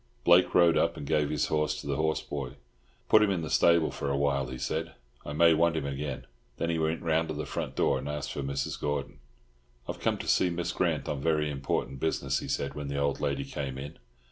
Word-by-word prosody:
Blake 85 +1 +5
rode 85 -2 +6
up - - +1
and - - -6
gave 75 0 +1
his 75 -1 0
horse 75 0 0
to - - -9
the 70 -1 -1
horse 80 +1 0
boy. 70 -2 -5 0.5
"Put 110 - +6
him 105 - +4
in 90 -4 0
the 80 - -5
stable 85 -2 +4
for 70 - -3
a 70 - 0
while," 70 -2 +1
he 65 0 -6
said. 80 +6 -3 0.3
"I 75 - -6
may 85 +2 +6
want 85 +1 +3
him 75 - -2
again." 70 -1 -4 0.3
Then 85 - -1
he 80 - -1
went 80 +1 -1
round 80 0 +1
to 80 - -4
the 75 - -3
front - - -4
door - - +2
and 70 - -5
asked 75 -1 -4
for - - -4
Mrs. 70 0 -3
Gordon. 75 -2 -3 0.7
"I - - -1
have - - -11
come - - +1
to - - -7
see 90 - +3
Miss 85 0 -2
Grant - - 0
on 70 -2 -2
very 75 0 +1
important 70 -1 -2
business," 70 -3 0
he - - -7
said 70 -1 -2
when 75 0 -5
the 70 0 -3
old 70 0 0
lady 70 -1 -1
came 70 -1 -5
in. 70 +2 -8
75 Hz, 245 wpm, -29 LUFS, 70-80 Hz, 0.7 s, rode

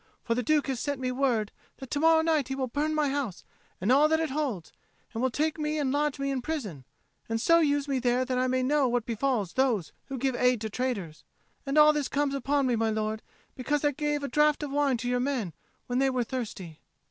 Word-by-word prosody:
For 230 - 0
the 245 - 0
Duke 295 +5 +2
has 265 -3 -2
sent 285 -2 -2
me 255 -1 -1
word 250 -5 0 0.3
that 265 -2 -10
to 290 - 0
morrow 320 +1 +5
night 315 -5 +1
he 265 - -3
will 265 -1 -1
burn 295 +5 -1
my 300 -2 +1
house 270 -9 -3 0.4
and 200 +6 +1
all 285 +4 +6
that 320 +1 +2
it 320 -4 -1
holds, 265 - -3 0.4
and 225 - -3
will 260 - +2
take 310 +5 -1
me 305 0 -1
and 280 -3 0
lodge 295 0 0
me 275 0 -2
in 265 -2 -2
prison, 220 - -5 0.4
and 225 0 -1
so 335 +8 +4
use 290 -2 +1
me 270 -2 0
there 250 +1 +1
that 255 0 -2
I 255 - +1
may 255 0 0
know 285 +1 +2
what 240 -2 0
befalls 230 -5 -1
those 245 -10 +1 0.2
who 270 -1 -5
give 260 0 0
aid 250 -1 +2
to 220 -1 -4
traitors. 200 -11 -3 0.4
And 275 +2 0
all 300 0 +7
this 295 -2 -1
comes 285 -1 0
upon 275 +1 0
me, 250 -2 +2
my 225 0 +1
lord, 215 0 -2 0.3
because 290 +3 -1
I 290 - +4
gave 295 0 -2
a - - -1
draught 300 +3 +2
of 290 - -4
wine 280 -3 +1
to 240 +2 -5
your 245 0 +1
men 245 - -2 0.3
when 245 +1 -1
they 270 0 +3
were 255 -2 0
thirsty." 215 - -6
265 Hz, 240 wpm, -28 LUFS, 240-290 Hz, 0.4 s, all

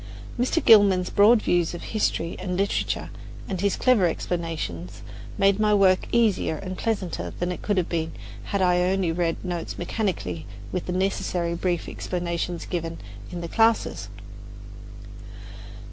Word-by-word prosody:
Mr. 260 +7 +1
Gilman's 200 -5 +6
broad 215 +2 +5
views 175 -1 +1
of - - -8
history 180 -5 -1
and 180 -1 -3
literature 200 +1 -1 0.4
and 185 -3 -3
his 200 -1 +2
clever 235 -8 +4
explanations 155 - -4 0.3
made 195 +1 +3
my 210 -1 +4
work 190 -2 +4
easier 220 -8 +2
and 185 +4 -6
pleasanter 185 - -3
than 175 +1 -1
it 180 - -6
could 205 -2 0
have 180 - +1
been 165 -1 -2 0.3
had 200 -1 0
I 180 -1 +3
only 185 -1 +1
read 170 +1 -1
notes 175 -2 -4
mechanically 160 - -3 0.2
with 180 - -3
the - - -2
necessarily 180 -2 -1
brief 175 0 -1
explanations 175 -1 -3
given 165 -2 -4 0.3
in 175 - -5
the 170 - -4
classes. 225 +5 +1
180 Hz, 145 wpm, -25 LUFS, 170-200 Hz, 0.4 s, Gilman's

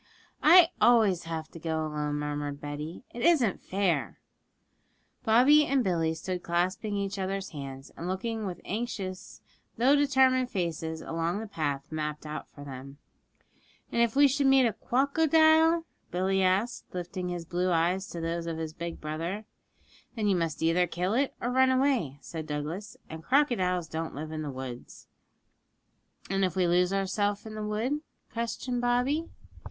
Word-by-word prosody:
'I 335 +1 +8
always 215 -8 +4
have 160 -1 -4
to 165 - -11
go 160 -1 -2
alone,' 150 -1 -2
murmured 145 -1 -3
Betty; 150 - -6
'it 240 - -7
isn't 285 - +3
fair.' 180 - 0 1.1
Bobby 255 +7 +6
and 270 -2 +2
Billy 165 -4 0
stood 180 +2 -4
clasping 185 +5 -1
each 200 0 -3
other's 195 +1 -3
hands, 135 -3 -8
and 170 - -6
looking 215 +3 -2
with 180 -2 -5
anxious 200 -4 -5 0.4
though 260 +5 +5
determined 265 -3 +3
faces 160 -4 -3
along 165 +3 -2
the 225 - -5
path 145 -9 -3
mapped 150 -1 -4
out 150 0 -6
for 145 - -12
them. 135 0 -9 0.9
'And 235 - +1
if 235 0 +2
we 285 +1 +7
should 280 +1 +1
meet 270 -1 +6
a 225 - +1
cwocodile?' 315 - +3 0.2
Billy 190 +2 +1
asked, 190 +6 +1
lifting 180 +1 -4
his 175 -1 -4
blue 180 +2 -1
eyes 180 +3 +1
to 170 - -7
those 165 0 -3
of 165 -1 -3
his 160 -1 -4
big 170 +1 -6
brother. 165 +7 -4 0.7
'Then 215 -3 0
you 200 - +3
must 165 -2 -2
either 175 +2 +3
kill 180 +4 -1
it 270 +3 +1
or 245 - -2
run 260 +1 +4
away,' 255 - +1
said 160 +3 -7
Douglas. 165 +10 -5
'And 160 0 -8
crocodiles 185 - +2
don't 160 -1 -4
live 155 +2 -6
in 155 -2 -4
woods.' 130 -2 -8 1.2
'And 195 0 0
if 185 -1 0
we 185 -1 +2
lose 180 +1 +3
ourselves 200 +2 0
in 220 - -7
the 215 - -5
wood?' 225 +8 -1 0.3
questioned 240 +1 -2
Bobby. 250 +7 +1
185 Hz, 160 wpm, -29 LUFS, 160-240 Hz, 1.2 s, I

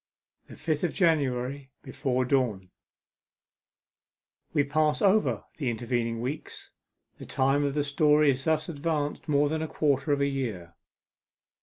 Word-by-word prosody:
THE - - -11
FIFTH 155 0 -2
OF 170 - -2
JANUARY. 140 -5 0
BEFORE 130 -3 -1
DAWN 120 -9 0 1.8
We 145 - +2
pass 150 +1 +1
over 190 - +2
the 140 -6 -1
intervening 115 0 -2
weeks. 135 +6 -6 0.5
The - - -9
time 135 +2 +1
of 140 0 -1
the 145 - +1
story 150 +1 +4
is 135 +1 -4
thus 155 -1 +1
advanced 150 -2 -3
more 145 0 +3
than 155 +2 -2
a 160 - -2
quarter 145 -1 0
of 145 - +2
a 140 - +2
year. 115 -12 -3
140 Hz, 140 wpm, -27 LUFS, 125-150 Hz, 1.8 s, story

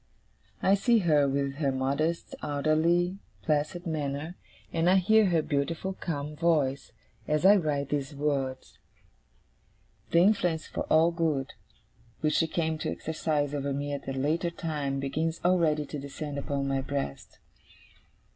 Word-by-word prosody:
I 190 - +5
see 230 +4 +4
her, 145 -4 +4
with 140 0 -1
her 140 -3 +1
modest, 140 +6 -1
orderly, 160 +5 +1 0.2
placid 155 - -1
manner, 155 +1 -3 0.4
and 165 +1 +2
I 185 - +5
hear 215 +3 +5
her 165 -3 +2
beautiful 160 +7 -1
calm 150 -5 -4
voice, 150 -5 +1 0.4
as 150 +3 +1
I 200 +2 +9
write 145 -5 -1
these 145 -1 -2
words. 135 -3 -2 1.3
The - - +2
influence 175 -3 +3
for - - -4
all 160 +2 +5
good, 160 -5 -1 0.7
which 155 -1 +1
she 165 - +2
came 160 -1 -1
to - - -2
exercise 150 -2 -1
over 140 -1 -2
me 145 +1 -3
at 140 -1 -6
a 135 - -2
later 155 +6 0
time, 150 -5 -3
begins 160 +4 -2
already 165 -5 +3
to 145 - -6
descend 140 +1 -5
upon 140 -1 -2
my 135 -1 0
breast. 135 - -5
150 Hz, 145 wpm, -28 LUFS, 140-170 Hz, 1.3 s, I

